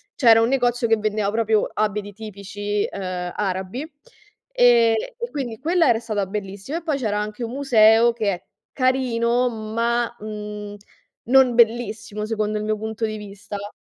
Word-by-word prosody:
c'era 230 -4 +6
un 225 +1 +2
negozio 245 -2 +1
che 225 - +3
vendeva 210 -1 -1
proprio 220 -1 +1
abiti 210 -1 -2
tipici, 205 0 -4
ehm, 180 -2 -4
arabi 195 - -3 0.6
e 235 - +3 0.2
quindi 245 -6 -4
quella 330 +4 +2
era 235 - +4
stata 215 -4 -2
bellissima 200 - -5
e 340 - -7
poi 310 -4 -1
c'era 210 -5 -1
anche 210 +3 -4
un 230 - -3
museo 235 -3 +5
che 215 -3 0
è 175 - -8 0.3
carino 250 -2 +1
ma, 230 +1 -1
mhmm, 210 -1 -7 0.5
non 255 0 +4
bellissimo 225 -2 +1
secondo 215 -1 -1
il 210 - -4
mio 215 0 0
punto 220 +1 -5
di 215 0 -5
vista. 205 0 -8
220 Hz, 150 wpm, -22 LUFS, 210-240 Hz, 0.6 s, c'era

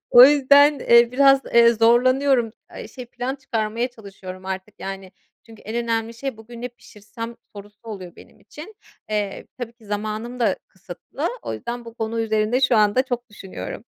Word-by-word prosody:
O 245 +1 +10
yüzden, 285 +1 +5
eee, 235 0 +5
biraz, 275 +1 +5
eee, 235 0 +7
zorlanıyorum. 240 +1 +3 0.2
Eee, - - -8
şey 250 -2 -10
plan 245 +2 -4
çıkarmaya 230 -2 -2
çalışıyorum 190 -4 -11
artık, 190 +2 -5
yani. 195 -1 -7 0.3
Çünkü 225 -2 -15
en 220 +3 -5
önemli 230 0 -2
şey, 260 0 -5
bugün 230 +2 -12
ne 250 - -3
pişirsem, 230 0 -10 0.2
sorusu 205 +1 -12
oluyor 195 -6 -9
benim - - -17
için. 300 - -12 0.4
Eee, 205 -2 -3
tabii 240 -2 -6
ki 235 -1 -23
zamanım 215 +4 -4
da 215 -5 +2
kısıtlı. - - -6
O - - -4
yüzden 240 0 -6
bu 230 -1 -11
konu 225 0 -3
üzerinde 220 +2 +1
şu 250 -2 +3
anda 210 +4 +4
çok 245 -2 -5
düşünüyorum. 195 -2 -8
230 Hz, 165 wpm, -22 LUFS, 215-250 Hz, 0.4 s, O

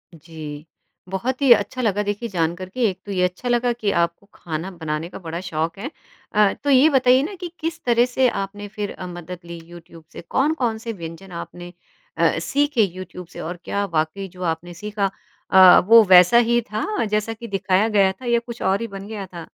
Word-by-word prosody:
जी, 155 -1 -9 0.4
बहुत 245 +8 -3
ही 270 -3 +4
अच्छा 255 +1 -2
लगा, 210 -2 +1
देखिए, 205 +3 -3
जान 170 -2 0
कर 185 +1 -8
के। 250 +6 -6
एक 185 - -7
तो 205 - -6
ये 185 -2 0
अच्छा 180 +7 -2
लगा 240 0 +2
कि 215 -4 -1
आपको 170 +3 -1
खाना 165 +3 -5
बनाने 160 -1 -4
का - - -9
बड़ा 170 -1 -5
शौक 165 -2 -3
है। 275 +8 -5 0.4
अ, 210 -1 +4
तो 285 - 0
ये 275 +3 +6
बताइए 255 -2 +4
ना 390 +6 -5
कि, 355 -1 -6
किस 330 +1 -4
तरह 240 0 +3
से 255 +1 +2
आपने 205 0 -5
फिर 205 0 -5
अ, 185 - -8
मदद 175 0 -8
ली 170 0 -8
यूट्यूब 170 -1 -13
से? - - -8
कौन-कौन 250 - 0
से 225 0 -6
व्यंजन 170 +1 -9
आपने 175 +1 -8 0.4
अ, - - +2
सीखे 285 -4 +1
यूट्यूब 185 -1 -6
से, - - -12
और 175 +2 -5
क्या 200 0 -1
वाक़ई 160 +5 -1
जो 180 0 -14
आपने 170 +1 -3
सीखा 205 +2 -2 0.4
अ, 185 -1 +9
वो 230 0 +8
वैसा 180 +6 +8
ही 240 - +4
था, 215 0 -4 0.2
जैसा 215 +2 -1
कि 235 +1 -9
दिखाया 195 0 +1
गया 200 -3 +3
था, 220 +7 -12
या 235 -1 +2
कुछ 235 0 -10
और 195 +3 +1
ही 230 - -3
बन 195 -1 -9
गया 210 -2 -6
था? 170 -2 -9
195 Hz, 210 wpm, -22 LUFS, 175-235 Hz, 0.4 s, अ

